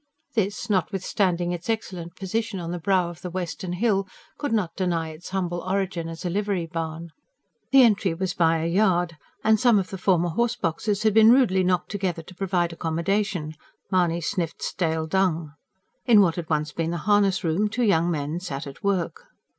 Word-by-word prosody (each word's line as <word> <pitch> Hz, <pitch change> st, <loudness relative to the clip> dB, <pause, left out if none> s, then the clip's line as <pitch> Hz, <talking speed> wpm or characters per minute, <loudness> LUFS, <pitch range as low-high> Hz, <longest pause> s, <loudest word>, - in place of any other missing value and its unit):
This, 205 Hz, -2 st, -1 dB
notwithstanding 185 Hz, -2 st, 0 dB
its 175 Hz, +5 st, -5 dB
excellent 185 Hz, -6 st, -3 dB
position 195 Hz, +2 st, -3 dB
on 170 Hz, -1 st, -5 dB
the 175 Hz, -, -3 dB
brow 180 Hz, 0 st, +1 dB
of 170 Hz, -, -13 dB
the 180 Hz, -, -5 dB
western 175 Hz, 0 st, -4 dB
hill, 195 Hz, 0 st, +1 dB, 0.3 s
could 290 Hz, -, -2 dB
not 205 Hz, -7 st, 0 dB
deny 170 Hz, -4 st, -1 dB
its 155 Hz, +2 st, -10 dB
humble 180 Hz, -2 st, -2 dB
origin 185 Hz, -2 st, -2 dB
as 165 Hz, +3 st, -8 dB
a -, -, 0 dB
livery 200 Hz, -2 st, -1 dB
barn. 165 Hz, 0 st, -5 dB, 0.6 s
The 270 Hz, -1 st, +7 dB
entry 200 Hz, -6 st, +3 dB
was 185 Hz, +1 st, -2 dB
by 165 Hz, -3 st, +2 dB
a -, -, -1 dB
yard; 175 Hz, -2 st, +2 dB, 0.3 s
and 220 Hz, 0 st, +4 dB
some 240 Hz, -4 st, +5 dB
of 190 Hz, -2 st, -1 dB
the 190 Hz, -, -5 dB
former 175 Hz, -2 st, +2 dB
horse 235 Hz, +7 st, 0 dB
boxes 200 Hz, +1 st, -1 dB
had 215 Hz, -2 st, +3 dB
been 220 Hz, +1 st, +7 dB
rudely 235 Hz, -8 st, +4 dB
knocked 180 Hz, -1 st, 0 dB
together 185 Hz, -5 st, -2 dB
to 185 Hz, -, -13 dB
provide 175 Hz, -2 st, -1 dB
accommodation. 170 Hz, 0 st, -1 dB, 0.4 s
Mahony 175 Hz, -2 st, +2 dB
sniffed 170 Hz, 0 st, -3 dB
stale 160 Hz, -2 st, -1 dB
dung. 165 Hz, -3 st, 0 dB, 0.5 s
In 225 Hz, -4 st, +7 dB
what 170 Hz, -4 st, +3 dB
had 170 Hz, -3 st, -5 dB
once 150 Hz, -1 st, 0 dB
been 165 Hz, +1 st, -2 dB
the 170 Hz, -, -2 dB
harness 205 Hz, -2 st, +3 dB
room, 175 Hz, +6 st, +1 dB
two 240 Hz, +3 st, -1 dB
young 175 Hz, -6 st, +3 dB
men 155 Hz, 0 st, -2 dB
sat 145 Hz, -7 st, -5 dB
at 140 Hz, -1 st, -10 dB
work. 200 Hz, -, -1 dB
180 Hz, 185 wpm, -25 LUFS, 165-200 Hz, 0.6 s, The